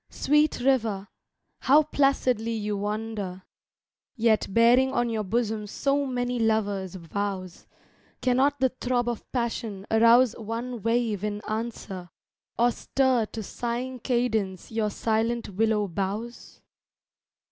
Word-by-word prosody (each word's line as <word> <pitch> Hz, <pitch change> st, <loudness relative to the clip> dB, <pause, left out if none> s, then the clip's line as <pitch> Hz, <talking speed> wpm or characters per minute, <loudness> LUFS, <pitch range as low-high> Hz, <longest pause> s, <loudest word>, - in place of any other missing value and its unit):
sweet 300 Hz, 0 st, +2 dB
river, 225 Hz, -7 st, +1 dB, 0.5 s
how 295 Hz, +4 st, +5 dB
placidly 255 Hz, -6 st, +1 dB
you 210 Hz, -2 st, -2 dB
wander, 205 Hz, -2 st, -4 dB, 0.7 s
Yet 225 Hz, -4 st, +2 dB
bearing 240 Hz, +5 st, +5 dB
on 240 Hz, -2 st, 0 dB
your 220 Hz, -1 st, -1 dB
bosom 215 Hz, 0 st, -1 dB
so 280 Hz, +6 st, 0 dB
many 245 Hz, -1 st, -1 dB
lovers' 205 Hz, -4 st, 0 dB
vows; 185 Hz, +1 st, -5 dB, 0.5 s
Cannot 265 Hz, +3 st, +2 dB
the 260 Hz, 0 st, +3 dB
throb 245 Hz, -1 st, -1 dB
of 240 Hz, -2 st, -4 dB
passion 225 Hz, -5 st, -3 dB
arouse 230 Hz, +2 st, +6 dB
one 230 Hz, +2 st, -4 dB
wave 230 Hz, -3 st, 0 dB
in 210 Hz, -1 st, -2 dB
answer, 215 Hz, -5 st, -5 dB, 0.5 s
Or 240 Hz, +1 st, +4 dB
stir 255 Hz, -3 st, +1 dB
to 220 Hz, 0 st, -6 dB
sighing 245 Hz, +4 st, -4 dB
cadence 220 Hz, -7 st, -1 dB
your 220 Hz, -1 st, 0 dB
silent 225 Hz, +2 st, -1 dB
willow 210 Hz, +1 st, +1 dB
boughs? 200 Hz, +6 st, -5 dB
225 Hz, 115 wpm, -26 LUFS, 210-245 Hz, 0.7 s, arouse